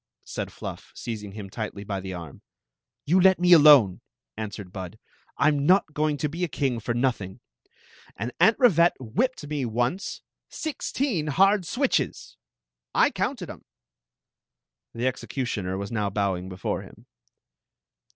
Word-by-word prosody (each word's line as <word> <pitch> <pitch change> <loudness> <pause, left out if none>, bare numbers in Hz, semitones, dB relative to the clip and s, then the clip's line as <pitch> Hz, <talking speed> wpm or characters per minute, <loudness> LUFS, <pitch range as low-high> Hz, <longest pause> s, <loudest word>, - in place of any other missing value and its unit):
said - - -5
Fluff, - - -8
seizing 105 -4 -6
him 105 -2 -7
tightly 105 0 -6
by 100 -1 -3
the 95 0 -6
arm. 85 -5 -8 0.6
You 180 +5 +4
let 190 0 +6
me 180 0 +3
donef* 145 - +8 0.4
answered 105 -3 -6
Bud 95 -3 -7 0.4
I - - +3
'm 145 -2 +2
not 185 -4 +4
going 150 -1 0
to 150 - -1
be 165 +5 -4
a - - +2
king 135 -5 -1
for 115 +2 -3
nothing. 120 -7 -1 0.8
And 115 +5 -4
Aunt 220 - +5
Rivette 175 - +5
whipped 150 - -1
me 145 -2 -3
once 120 - -2
— - - -64
sixteen 270 - -2
hard 195 +4 +3
switches! 265 +1 -1 0.6
I - - +4
counted - - -3
♦ - - -4
»♦ - - -6
em. - - -26 1.3
The 120 +2 -2
executioner 120 -7 -2
was 100 +3 -5
now 105 -3 0
bowing 95 -2 -1
htUxt 90 0 -10
htm. - - -5
125 Hz, 150 wpm, -26 LUFS, 100-170 Hz, 1.3 s, donef